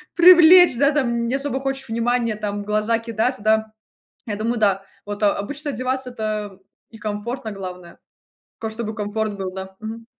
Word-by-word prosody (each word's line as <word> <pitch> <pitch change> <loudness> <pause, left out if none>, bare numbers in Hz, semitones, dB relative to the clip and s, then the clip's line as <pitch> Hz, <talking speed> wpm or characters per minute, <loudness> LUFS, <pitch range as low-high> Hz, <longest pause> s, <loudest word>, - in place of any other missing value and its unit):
привлечь 350 -3 +8
да 280 +1 +4
там, 235 -5 0
не 255 - 0
особо 275 -1 -1
хочешь 270 -1 -4
внимания 230 0 0
там, 205 -1 -4
в - - -14
глаза 215 +2 +1
кидаться, 230 +1 -2
да. 220 0 +1 0.5
Я 210 - -2
думаю, 230 +2 -1
да. 195 -2 +2 0.2
Вот 205 +1 -5
о 200 - +4
обычно 290 +8 -4
одеваться- 260 0 -3
это 215 -4 -4 0.3
и 225 - -12
комфортно, 220 +3 -4
главное. 180 -3 -9 0.6
Ка 220 -1 -4
чтобы 220 -1 -5
комфорт 210 0 -3
был, 190 -1 -5
да. 190 0 -7
Мгм. 225 +1 -7
220 Hz, 170 wpm, -21 LUFS, 205-255 Hz, 0.6 s, привлечь